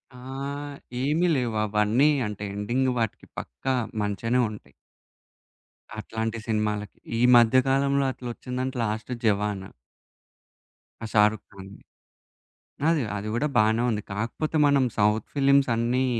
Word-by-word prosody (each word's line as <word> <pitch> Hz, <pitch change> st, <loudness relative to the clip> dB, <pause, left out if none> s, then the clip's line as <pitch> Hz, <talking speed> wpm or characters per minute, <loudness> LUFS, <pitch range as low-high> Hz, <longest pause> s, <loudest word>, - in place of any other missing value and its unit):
ఆహ్, 140 Hz, +3 st, -6 dB, 0.3 s
ఏమి 155 Hz, +6 st, +2 dB
లేవు 120 Hz, -4 st, -1 dB
అవన్నీ 110 Hz, +7 st, +3 dB, 0.2 s
అంటే 105 Hz, 0 st, -6 dB
ఎండింగ్ 120 Hz, +6 st, 0 dB
వాటికి 115 Hz, -2 st, -3 dB
పక్కా 130 Hz, -, -3 dB, 0.3 s
మంచిగనే 105 Hz, +4 st, 0 dB
ఉంటయి. 105 Hz, -, -11 dB, 1.3 s
అట్లాంటి 110 Hz, +1 st, -3 dB
సినిమాలకి. 105 Hz, -2 st, -2 dB, 0.2 s
ఈ -, -, +1 dB, 0.2 s
మధ్యకాలంలో 135 Hz, +3 st, +3 dB
అట్లొచ్చిందంటే, 125 Hz, +1 st, -5 dB
లాస్ట్ 110 Hz, +3 st, -3 dB
'జవాన్.' 105 Hz, -2 st, 0 dB, 1.4 s
ఆ -, -, -2 dB
'షారుక్ 105 Hz, -1 st, +3 dB
ఖాన్‌ది'. 95 Hz, 0 st, -12 dB, 1.1 s
అది 160 Hz, -4 st, +2 dB
అది 105 Hz, +1 st, -4 dB
కూడా 150 Hz, +5 st, +1 dB
బానే 110 Hz, +2 st, +3 dB
ఉంది. 105 Hz, -2 st, -2 dB
కాకపోతే 120 Hz, +10 st, -3 dB
మనం 140 Hz, -2 st, +4 dB
సౌత్ 105 Hz, +1 st, +2 dB
ఫిల్మ్స్ 140 Hz, -1 st, +4 dB
అన్నీ 120 Hz, +3 st, +1 dB
115 Hz, 110 wpm, -26 LUFS, 105-135 Hz, 1.4 s, మనం